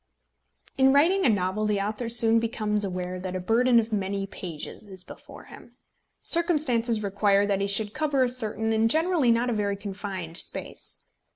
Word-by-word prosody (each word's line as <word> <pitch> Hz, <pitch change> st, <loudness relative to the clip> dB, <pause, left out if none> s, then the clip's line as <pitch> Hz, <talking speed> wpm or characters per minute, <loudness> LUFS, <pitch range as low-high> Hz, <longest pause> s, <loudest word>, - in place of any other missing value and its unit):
In 265 Hz, 0 st, +5 dB
writing 340 Hz, +5 st, +3 dB
a -, -, +4 dB
novel 205 Hz, +1 st, 0 dB
the 210 Hz, -1 st, 0 dB
author 215 Hz, +4 st, -3 dB
soon 230 Hz, -1 st, +5 dB
becomes 215 Hz, -2 st, -1 dB
aware 185 Hz, -1 st, -4 dB
that 185 Hz, 0 st, -5 dB
a -, -, -2 dB
burden 235 Hz, +5 st, +3 dB
of 225 Hz, 0 st, -3 dB
many 195 Hz, -1 st, -2 dB
pages 175 Hz, -4 st, -8 dB
is 190 Hz, -3 st, -7 dB
before -, -, -13 dB
him. -, -, -15 dB, 0.5 s
Circumstances 255 Hz, -10 st, +2 dB
require 200 Hz, 0 st, +2 dB
that 200 Hz, -1 st, 0 dB
he 200 Hz, -, 0 dB
should 205 Hz, +1 st, +1 dB
cover 295 Hz, -4 st, +1 dB
a 250 Hz, -, +1 dB
certain 225 Hz, -2 st, -1 dB
and 220 Hz, +1 st, +2 dB
generally 320 Hz, -2 st, +2 dB
not 235 Hz, +1 st, +2 dB
a -, -, 0 dB
very 205 Hz, -2 st, -1 dB
confined 195 Hz, -4 st, -6 dB
space. -, -, -5 dB
215 Hz, 175 wpm, -26 LUFS, 195-240 Hz, 0.5 s, In